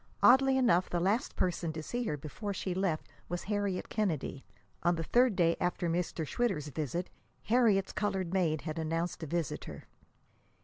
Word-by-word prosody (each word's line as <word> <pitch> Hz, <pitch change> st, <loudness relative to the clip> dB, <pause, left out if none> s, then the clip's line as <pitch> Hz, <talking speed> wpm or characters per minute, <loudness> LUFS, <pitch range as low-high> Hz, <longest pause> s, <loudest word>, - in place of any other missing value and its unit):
Oddly 265 Hz, +1 st, +6 dB
enough, 225 Hz, -9 st, +3 dB
the 175 Hz, -, 0 dB
last 205 Hz, +10 st, 0 dB
person 175 Hz, -2 st, 0 dB
to 160 Hz, 0 st, -5 dB
see 245 Hz, +8 st, -3 dB
her 150 Hz, -, -1 dB
before 190 Hz, +8 st, -5 dB
she 185 Hz, -1 st, -2 dB
left 180 Hz, -4 st, -1 dB, 0.2 s
was 175 Hz, +1 st, -3 dB
Harriet 205 Hz, -2 st, -1 dB
Kennedy. 160 Hz, -10 st, -2 dB, 0.4 s
On 175 Hz, 0 st, +3 dB
the 165 Hz, -, -2 dB
third 245 Hz, +4 st, +3 dB
day 170 Hz, -2 st, +3 dB
after 175 Hz, 0 st, 0 dB
Mr. 170 Hz, -1 st, -1 dB
Schwitter's 150 Hz, -, -1 dB
visit, 155 Hz, +4 st, -3 dB, 0.3 s
Harriet's 220 Hz, -5 st, +3 dB
colored 190 Hz, -4 st, -1 dB
maid 165 Hz, -5 st, +1 dB
had 155 Hz, 0 st, -4 dB
announced 165 Hz, +3 st, -2 dB
a 160 Hz, -, -4 dB
visitor. 170 Hz, -1 st, -3 dB
180 Hz, 165 wpm, -32 LUFS, 165-205 Hz, 0.4 s, Oddly